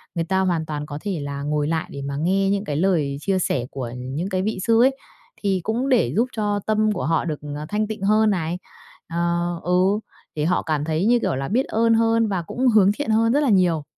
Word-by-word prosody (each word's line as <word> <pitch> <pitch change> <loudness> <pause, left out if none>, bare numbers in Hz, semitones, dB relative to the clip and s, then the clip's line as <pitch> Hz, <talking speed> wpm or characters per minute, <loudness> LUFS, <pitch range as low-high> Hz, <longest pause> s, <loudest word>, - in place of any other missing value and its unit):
người 170 - 0
ta 190 +2 0
hoàn 175 -4 0
toàn 150 -1 -4
có 145 -1 -6
thể 195 -5 -3
là 140 0 -5
ngồi 150 0 0
lại 160 0 -1
để 140 - -6
mà 140 0 -4
nghe 195 +5 +1
những 200 0 0
cái 145 - -3
lời 155 -5 +1
chia 195 +1 0
sẻ 130 -8 -1
của 125 -4 -5
những 135 +9 -4
cái 185 -2 -1
vị 205 -1 -2
sư 230 0 +4
ấy, 270 +1 +3 0.4
thì 195 -2 +1
cũng 240 +7 -1
để 250 -3 +2
giúp 235 +4 +2
cho 205 -1 0
tâm 215 0 +2
của 200 - -2
họ 165 +1 +1
được, 155 -3 -3 0.2
ờ, 150 +1 -5
thanh 210 0 0
tịnh 215 -2 -6
hơn 215 +2 +4
này. 175 -2 -1 0.5
Ờ, 170 +1 -1
ừ, 180 - 0 0.6
để 150 - -1
họ 180 +2 +2
cảm 155 -3 -1
thấy, 160 +3 0
như 240 +2 +4
kiểu 130 - -1
là, 135 +1 -3
biết 250 +7 +1
ơn 230 +1 +2
hơn 225 0 +3
và 190 -4 -1
cũng 250 +10 -1
hướng 210 -4 +5
thiện 225 +3 -4
hơn 225 +1 +3
rất 285 - +3
là 275 - +2
nhiều. 180 -6 +3
185 Hz, 245 wpm, -22 LUFS, 155-215 Hz, 0.6 s, hướng